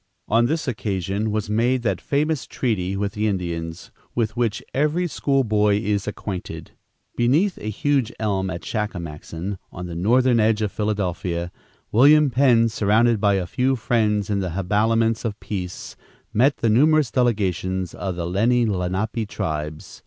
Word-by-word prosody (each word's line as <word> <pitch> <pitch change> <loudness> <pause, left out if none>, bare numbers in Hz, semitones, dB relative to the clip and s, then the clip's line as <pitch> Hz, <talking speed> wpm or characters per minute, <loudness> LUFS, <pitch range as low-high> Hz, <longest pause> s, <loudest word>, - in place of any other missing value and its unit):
On 115 +2 +3
this 160 +2 -2
occasion 105 -3 -2
was 105 -1 -2
made 120 +4 +1
that 100 -6 -1
famous 150 +1 -1
treaty 100 -6 -1
with 100 0 -2
the 105 +1 0
Indians, 85 -4 -4 0.2
with 110 -2 0
which 120 -3 -1
every 150 +6 +1
school 140 -3 +1
boy 105 -2 +2
is 105 -1 -1
acquainted. 100 -3 -6 0.4
Beneath 150 +11 +2
a 105 - -4
huge 130 +2 0
elm 95 -3 -1
at 85 -1 -5
Shakamaxon, 90 -2 -4
on 90 - -7
the 85 - -6
northern 120 +7 +3
edge 110 0 +2
of 105 - -1
Philadelphia, 90 -5 -2 0.4
William 145 +5 +6
Penn, 120 -3 +4
surrounded 110 +1 +2
by 100 -2 +3
a 95 -2 -1
few 130 +7 0
friends, 105 -4 0
in 100 - +1
the 95 -2 -2
habiliments 110 +4 +1
of 110 -3 -3
peace, 90 -4 -6 0.4
met 130 +4 +3
the 115 - +1
numerous 150 +2 +4
delegations 95 -7 0
of 95 -2 -4
the 85 -1 -3
Lenni 115 +7 +2
Lenape 105 +3 -1
tribes. 75 -2 -4
105 Hz, 155 wpm, -22 LUFS, 95-120 Hz, 0.4 s, William